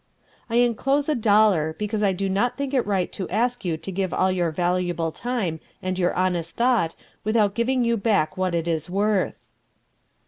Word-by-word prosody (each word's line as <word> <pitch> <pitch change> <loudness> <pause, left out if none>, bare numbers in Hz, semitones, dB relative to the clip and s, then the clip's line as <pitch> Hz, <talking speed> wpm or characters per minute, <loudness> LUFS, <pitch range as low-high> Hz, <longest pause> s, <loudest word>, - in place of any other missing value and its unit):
"I 230 - -2
enclose 255 +4 +2
a - - +3
dollar, 205 - +3
because 210 0 -2
I 200 -2 +3
do 195 +1 -2
not 230 +6 0
think 280 -1 -3
it 255 -6 +1
right 190 -3 0
to 190 - -5
ask 240 +5 0
you 170 -4 -1
to 160 +4 -7
give 190 0 -2
all 185 0 +2
your 175 -2 0
valuable 175 0 -1
time 200 -5 -3 0.2
and 185 0 -3
your 175 -1 +2
best 180 -3 -1
thought 235 -9 +2 0.3
without 215 -2 +2
giving 245 +3 +1
you 235 0 +1
back 200 -6 +1
what 185 -2 -1
it 165 0 -1
is 165 -1 -2
worth." 200 +1 0
195 Hz, 185 wpm, -24 LUFS, 175-235 Hz, 0.3 s, a